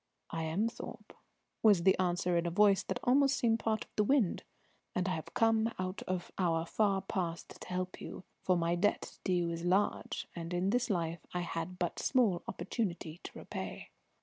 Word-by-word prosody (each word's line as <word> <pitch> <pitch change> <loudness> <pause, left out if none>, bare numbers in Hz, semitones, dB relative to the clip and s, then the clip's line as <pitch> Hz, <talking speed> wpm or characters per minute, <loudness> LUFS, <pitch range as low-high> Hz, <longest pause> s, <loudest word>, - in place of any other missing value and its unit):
"I 165 -1 -2
am 180 +8 +1
Thorpe," 235 - -8 0.5
was 205 -6 +6
the 190 +1 +6
answer 180 -1 +1
in 170 0 +2
a - - +1
voice 195 +2 +5
that - - -3
almost 275 +2 +4
seemed 230 -1 +2
part 220 -1 0
of - - -34
the 210 - +3
wind. 235 -5 +2 0.5
"And 180 0 +1
I - - +1
have 160 -3 -6
come 225 0 +3
out 185 +1 -3
of 185 -1 -2
our 165 -3 +2
far 195 +1 +1
past 175 -4 -4
to - - -8
help 185 0 -3
you, - - -7 0.2
for 185 -1 +2
my 170 0 +1
debt 190 +4 0
to 190 - +1
you 175 -2 +2
is 165 0 -4
large, 185 +4 +1
and 170 0 -4
in 185 +3 +1
this 245 +1 +1
life 170 -4 0 0.2
I 180 - +1
had 175 +1 -4
but 175 -2 -2
small 225 -10 +3
opportunity 175 -4 -3
to - - -8
repay." - - -6
185 Hz, 195 wpm, -33 LUFS, 170-210 Hz, 0.5 s, was